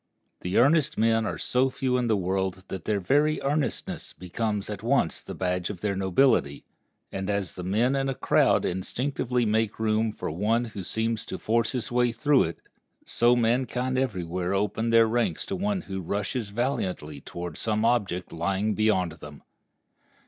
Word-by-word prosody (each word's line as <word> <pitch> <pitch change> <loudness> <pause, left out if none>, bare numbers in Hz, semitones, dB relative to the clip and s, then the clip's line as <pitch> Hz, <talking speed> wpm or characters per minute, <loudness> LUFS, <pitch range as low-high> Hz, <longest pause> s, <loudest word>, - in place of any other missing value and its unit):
The 90 +1 -2
earnest 145 +4 +4
men 115 0 +2
are - - -3
so 130 +1 +1
few 130 -1 -1
in 125 -1 +1
the 110 -2 +2
world 95 0 -1
that 95 -3 -6
their 105 -2 +1
very 145 +11 +2
earnestness 145 +1 -2
becomes 105 +2 -3
at 105 -2 -5
once 115 -7 +1
the - - -8
badge 90 -1 -1
of 95 -4 -7
their 105 -2 0
nobility; 95 - +2 0.5
and 95 +1 -4
as 100 -3 -1
the 90 - -7
men 115 +9 +1
in 135 0 0
a 135 - -2
crowd - - +3
instinctively 125 +6 -1
make 110 0 +1
room 110 0 +1
for 105 - -5
one 110 +8 +1
who 105 -4 -7
seems 110 +3 -1
to - - -4
force 115 +1 +1
his 120 -3 -3
way 120 0 +2
through 140 +4 +3
it, 80 0 -6 0.4
so 120 +1 +3
mankind 125 +2 0
every 125 -9 0
where 90 +3 -2
open 105 +3 0
their 115 0 +6
ranks 115 +1 0
to 195 - -3
one 200 0 -1
who 95 - -5
rushes 100 +5 -2
valiantly 95 - -2
toward 85 -2 -7
some 110 0 0
object 100 -7 0
lying 100 +5 0
beyond 105 -6 +2
them. 75 -1 -11
110 Hz, 175 wpm, -26 LUFS, 95-125 Hz, 0.5 s, their